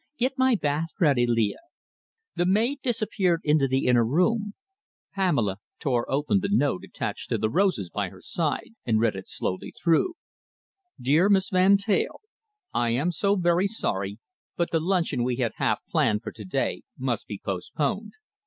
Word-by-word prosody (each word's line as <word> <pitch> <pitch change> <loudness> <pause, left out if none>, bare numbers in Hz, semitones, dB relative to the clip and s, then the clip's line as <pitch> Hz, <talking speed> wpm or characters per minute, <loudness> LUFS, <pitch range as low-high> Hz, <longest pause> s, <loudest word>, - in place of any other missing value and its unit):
"Get 255 +2 0
my 260 -2 +3
bath 155 -2 -1
ready, 140 -8 +3
Leah." 115 -3 +1 0.8
The 175 - +1
maid 230 +9 +2
disappeared 210 -8 0
into 150 -2 +3
the 130 +1 0
inner 120 -2 +4
room. 200 - +1 0.6
Pamela 140 - +1 0.2
tore 125 -5 -1
open 145 +8 +1
the 200 +1 -2
note 145 - +1
attached - - -5
to - - +1
the 110 0 -1
roses 180 - +1
by 100 -3 -2
her 95 - -14
side, 160 - -2
and 110 -3 +1
read 110 -3 +2
it 95 - -7
slowly 95 - -3
through: 170 - +1 0.8
Dear 155 +10 +3
Miss 195 -1 +3
Van 190 +2 +5
Teyl, 200 0 0 0.5
I 120 -1 +1
am 135 +10 +1
so 200 +4 +1
very 175 0 +2
sorry, 100 - -2 0.4
but 170 - 0
the 165 - +2
luncheon 170 -7 0
we 125 0 0
had 120 -3 0
half - - +1
planned 105 +1 +1
for - - -5
to 105 - -10
day 95 - -1 0.2
must 125 -4 -2
be 105 - -5
postponed. 145 - -3
155 Hz, 165 wpm, -26 LUFS, 120-195 Hz, 0.8 s, Van